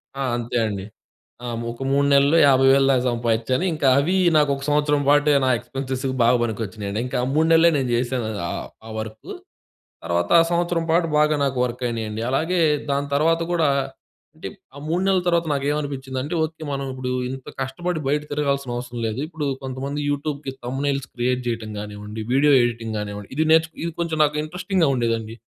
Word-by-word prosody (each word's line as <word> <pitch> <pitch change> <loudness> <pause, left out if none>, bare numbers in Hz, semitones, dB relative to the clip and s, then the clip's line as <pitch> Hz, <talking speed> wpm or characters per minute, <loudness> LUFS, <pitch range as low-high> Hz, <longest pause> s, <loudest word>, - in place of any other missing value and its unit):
ఆ! 135 - -2
అంతే 120 +1 -3
అండి. 100 -2 -4 0.6
ఆ! - - -4 0.2
ఒక 120 - -11
3 140 +1 +3
నెలల్లో 140 +3 +5
50,000 135 0 +5
దాక 130 -2 +2
సంపాదించాను. 120 +5 0
ఇంకా 150 -3 0
అవి 170 +7 +1 0.2
నాకు 150 -1 +3
ఒక 135 - -8
సంవత్సరం 145 0 +2
పాటు, 145 +1 +4 0.2
నా - - +2
ఎక్స్‌పెన్సెస్ 130 +2 -5 0.2
బాగా 120 +1 +4
పనికొచ్చినయండి. 105 -2 -3
ఇంకా - - -3
ఆ - - 0
3 160 +2 +3
నెలలే 165 +1 +6
నేను 130 -2 -1
చేశాను 120 -2 -1 0.2
ఆ - - -3 0.3
ఆ - - -9
వర్కు. 110 0 -7 0.7
తర్వాత 85 0 -1
ఆ - - +4
సంవత్సరం 170 -1 0
పాటు 165 +1 +3
బాగా 150 0 +3
నాకు 135 -2 -1
వర్క్ 125 +1 -6
అయినాయండి. 110 -2 -4
అలాగే 165 +7 0 0.3
దాని 140 0 0
తర్వాత 165 +3 +3
గూడా, 165 -4 +2 0.7
అంటే 160 - -7 0.3
ఆ - - -10
3 170 +3 0
నెలల 190 -1 +3
తర్వాత 170 -1 +2
నాకు 140 -1 -2
ఏమనిపించిందంటే, 140 -1 -4
ఓకే, 160 0 -5
మనం 140 0 -3
ఇప్పుడు 130 -1 -4 0.2
ఇంత 130 0 -8
కష్టపడి 160 +5 -3
బయట 150 +2 +1
తిరగాల్సిన 140 -3 -1
అవసరం 120 -1 -6
లేదు. 110 +3 -4
ఇప్పుడు 160 -2 -5 0.2
కొంతమంది 135 +2 -4
యూట్యూబ్‌కి 145 -1 -3
థంబ్‌నెయిల్స్ 135 +1 -2
క్రియేట్ 125 +1 0
చేయటం 115 -2 -3
గానివ్వండి, 105 +1 -7
వీడియో 145 +2 +4
ఎడిటింగ్ 115 -2 -2
గానివ్వండి, 105 -1 -6
ఇది 155 - +2
నేర్చు 160 0 +3
ఇది 170 - -2
కొంచెం 165 -2 -2
నాకు 150 0 -2
ఇంట్రెస్టింగ్‌గా 180 0 0
ఉండేదండి. 115 -2 -1
135 Hz, 175 wpm, -22 LUFS, 120-150 Hz, 0.7 s, నెలలే